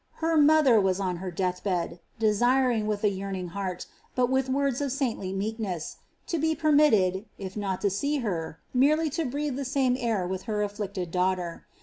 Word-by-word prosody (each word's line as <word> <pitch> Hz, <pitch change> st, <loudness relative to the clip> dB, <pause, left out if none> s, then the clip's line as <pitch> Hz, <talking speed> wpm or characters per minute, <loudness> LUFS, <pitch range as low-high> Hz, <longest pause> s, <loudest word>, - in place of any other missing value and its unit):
Her 325 Hz, 0 st, 0 dB
mother 295 Hz, -6 st, +6 dB
was 190 Hz, 0 st, +1 dB
on 185 Hz, -3 st, -1 dB
her 185 Hz, +2 st, -5 dB
death 180 Hz, 0 st, -2 dB
bed, 175 Hz, -3 st, -1 dB, 0.2 s
desiring 235 Hz, +1 st, +2 dB
with 210 Hz, 0 st, -2 dB
a 210 Hz, -, +5 dB
yearning 190 Hz, -2 st, -4 dB
heart, 185 Hz, 0 st, -4 dB, 0.3 s
but 250 Hz, 0 st, +2 dB
with 265 Hz, 0 st, +1 dB
words 275 Hz, 0 st, 0 dB
of 280 Hz, -2 st, -1 dB
saintly 245 Hz, -8 st, -2 dB
meekness, 195 Hz, -4 st, -3 dB, 0.3 s
to 335 Hz, -, -2 dB
be 320 Hz, +1 st, +1 dB
permitted, 280 Hz, -, +3 dB
if 190 Hz, -1 st, -7 dB
not 195 Hz, -3 st, -2 dB
to 200 Hz, -, +1 dB
see 285 Hz, +10 st, 0 dB
her, 165 Hz, -5 st, -3 dB
merely 300 Hz, +4 st, +3 dB
to 330 Hz, +3 st, -1 dB
breathe 285 Hz, +1 st, -2 dB
the 280 Hz, -, -2 dB
same 260 Hz, -1 st, +1 dB
air 225 Hz, -6 st, 0 dB
with 185 Hz, +1 st, -4 dB
her 210 Hz, -1 st, 0 dB
afflicted 200 Hz, -4 st, -4 dB
daughter. 180 Hz, -1 st, -1 dB
210 Hz, 185 wpm, -27 LUFS, 190-270 Hz, 0.3 s, mother